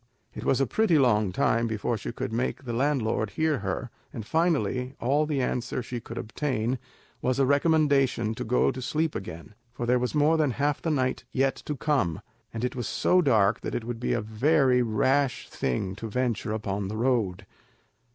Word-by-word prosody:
It - - -7
was 135 - +2
a 135 - +3
pretty 215 -3 +2
long 105 -8 +3
time 115 +5 +1
before 110 +1 -1
she 110 - -5
could 115 - -5
make 125 +4 -2
the 120 - -3
landlord 120 -5 0
hear 155 +4 0
her; 100 +5 -3 0.2
and 110 - -7
finally, 130 - 0
all 145 +5 +1
the 140 -4 0
answer 125 0 -2
she 125 0 -5
could 115 +1 -9
obtain 125 0 -2 0.4
was 130 0 0
a 135 - +3
recommendation 140 -5 +2
to - - -5
go 125 +3 +2
to 130 - -7
sleep 155 +4 -1
again, 85 0 -7 0.2
for 120 - -4
there 125 +1 +3
was 125 +4 -2
more 150 +2 +4
than 155 -3 +2
half 145 +1 0
the 165 - -1
night 130 -4 0
yet 135 +1 +1
to 150 - -2
come, 125 - 0 0.3
and 115 +1 -5
it 125 - -3
was 120 -2 -3
so 180 0 +3
dark 110 - +3
that - - -4
it 120 - -2
would 120 0 -5
be 125 - 0
a 120 - 0
very 125 +4 +3
rash 130 +4 +1
thing 70 +9 -2
to 115 - -5
venture 120 -2 -1
upon 100 -2 -2
the 105 +2 -4
road. 110 -6 0
125 Hz, 195 wpm, -27 LUFS, 110-140 Hz, 0.4 s, more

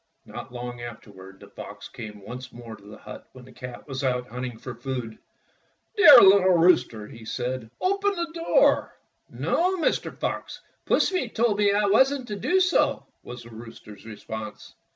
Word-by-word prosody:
Not - - -9
long 120 0 -7
afterward 95 -5 -11
the - - -14
fox - - -10
came 105 -2 -10
once 125 +1 -8
more 120 -2 -10
to 100 - -20
the 105 +1 -12
hut 105 - -11
when 130 -1 -13
the 130 - -15
cat 125 +1 -10
was 135 -1 -5
out 125 -1 -1
hunt 125 +1 -5
ing 120 -2 -9
for 130 +2 -8
food. 125 -5 -6 0.8
"Dear 325 -10 +9
little 190 -2 +6
rooster," 125 -11 +3
he 115 +1 -13
said, 125 0 -4
"open 395 +2 0
the 340 -2 -4
door." 335 +9 +2 0.3
"No, 365 +2 0
Mr. 330 - -1
Fox, - - -4 0.3
Pussy 360 -11 +1
told 220 -2 0
me 205 -1 +4
I 205 +1 +2
wasn't 260 +5 +2
to 210 - -3
do 360 - +1
so," 365 -1 +1 0.2
was 120 0 -10
the 115 - -14
rooster's 110 -3 -12
response. 110 0 -9
125 Hz, 175 wpm, -25 LUFS, -, 0.8 s, Dear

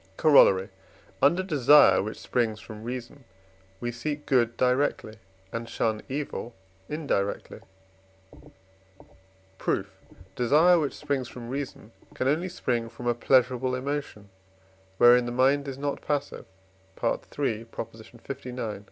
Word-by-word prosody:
Corollary. 105 -11 +5 0.5
Under 170 +7 +4
desire 150 -4 +6
which 105 +3 -5
springs 115 -3 -1
from 110 +1 -10
reason, 125 +3 -7 0.6
we 120 0 -3
seek 145 +5 -5
good 120 -3 +2
directly, 125 -3 0 0.4
and 115 0 -5
shun 110 -1 -1
evil 135 -4 -5 0.3
indirectly. 145 -10 -2 2.0
Proof. - - -2 0.4
Desire 155 +8 +5
which 145 -3 -2
springs 140 -4 -2
from 120 -1 -9
reason 130 -4 -6 0.2
can 130 - -1
only 165 +6 +1
spring 120 -9 -2
from 120 - -10
a 120 - +2
pleasurable 125 +1 +2
emotion, 130 -6 -5 0.7
wherein 120 +1 +6
the - - -3
mind 135 +3 +2
is 135 -1 -5
not 140 0 -3
passive 145 -1 -3 0.6
(III. 115 -5 -2
lix.) 115 0 -7
125 Hz, 115 wpm, -27 LUFS, 115-145 Hz, 2.0 s, desire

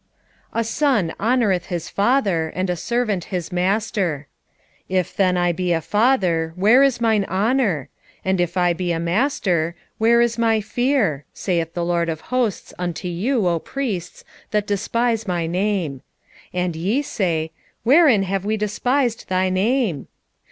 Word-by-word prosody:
1:6 - - +1
A - - +2
son 225 - +1
honoureth 215 -6 +1
his 170 -2 -4
father, 200 -8 +1
and 185 0 -1
a - - -1
servant 215 -1 -1
his 180 -2 -4
master: 185 -4 0 0.6
if 185 -2 -1
then 185 -2 +2
I 175 0 +2
be 180 +1 -2
a 165 - +1
father, 185 - +1
where 215 +8 +5
is 275 -3 +3
mine 220 -3 +2
honour? 200 - 0 0.4
and 190 -1 +1
if 175 +1 -2
I 175 -1 +3
be 175 0 -2
a 165 - -1
master, 175 - 0 0.2
where 230 +2 +4
is 235 0 +1
my 225 -1 +3
fear? 215 - 0
saith 170 -3 -2
the 175 -1 -1
LORD 170 -1 0
of 160 -1 -4
hosts 245 -6 -1
unto 180 0 -3
you, 200 +5 0
O 170 -1 +1
priests, 210 - -4 0.3
that 210 -1 0
despise 225 +2 0
my 175 -2 -1
name. 175 -6 -1 0.5
And 180 -2 -2
ye 200 - 0
say, 165 - -1 0.3
Wherein 265 - +5
have 195 0 -2
we 215 +2 0
despised 240 +4 -1
thy 185 0 +1
name? 195 - 0
190 Hz, 155 wpm, -21 LUFS, 175-230 Hz, 0.6 s, where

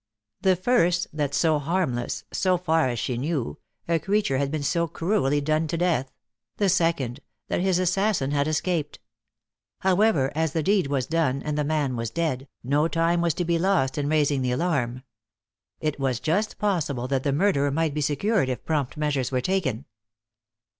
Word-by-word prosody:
The 190 -1 +4
first, 180 -3 +2
that 145 -2 -1
so 155 0 +3
harmless 145 -6 -1
so 185 -2 +2
far 160 -5 +1
as 120 - -3
she 120 +2 -2
knew 135 - -2 0.3
a 165 -1 +2
creature 195 -8 0
had 140 -1 0
been 150 0 -3
so 170 +3 +1
cruelly 165 -4 0
done 155 +2 +1
to 165 - -2
death; 160 -7 0 0.5
the 200 - +2
second, 165 -8 +1 0.3
that - - 0
his 190 -1 +2
assassin 185 -5 +1
had 145 0 +1
escaped. 155 -1 -1 0.8
However, 190 -7 +3
as 160 0 0
the 160 - 0
deed 195 -3 +2
was 135 -3 -1
done, 150 -5 0
and 150 -1 -2
the 150 - 0
man 145 -3 0
was 115 -1 -3
dead, 145 -2 -2 0.2
no 145 +5 +2
time 165 +1 +1
was 170 -2 +1
to 175 - -1
be 170 0 +1
lost 170 -8 +1
in 145 -1 -1
raising 145 -3 +2
the 125 -1 0
alarm. 130 -5 -1 0.8
It 155 -2 -2
was 130 -4 0
just 190 - 0
possible 150 -11 -1
that 135 0 0
the 140 - 0
murderer 145 -2 +2
might 155 +1 0
be 150 - -2
secured 150 - +1
if 125 - -4
prompt 150 -4 -1
measures 145 -4 -1
were 130 - +1
taken. 145 - -1
155 Hz, 180 wpm, -25 LUFS, 135-175 Hz, 0.8 s, The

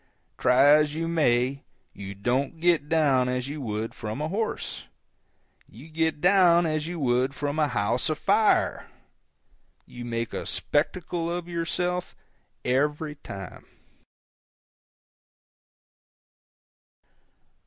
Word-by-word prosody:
Try 125 +2 +4
as 150 +1 +5
you 165 +1 -2
may, 140 -4 +1 0.3
you 100 0 -8
don't 130 +9 -1
get 165 -4 +2
down 140 -6 +3
as 125 0 -2
you 145 +1 -5
would 110 -2 -3
from 110 +3 -6
a 155 +1 -2
horse, 215 +5 -3 0.8
you 130 +9 -13
get 160 -1 -1
down 175 -1 +5
as 155 -1 -1
you 175 -1 -5
would 130 0 +1
from 145 +2 -2
a 150 - +3
house 120 +2 0
afire. 200 +7 +2 1.0
You 120 - -9
make 115 -1 -3
a - - -4
spectacle 170 +2 -1
of 175 0 -4
yourself 175 +1 -2 0.5
every 150 +4 0
time. 95 - -10
150 Hz, 110 wpm, -26 LUFS, 125-165 Hz, 1.0 s, as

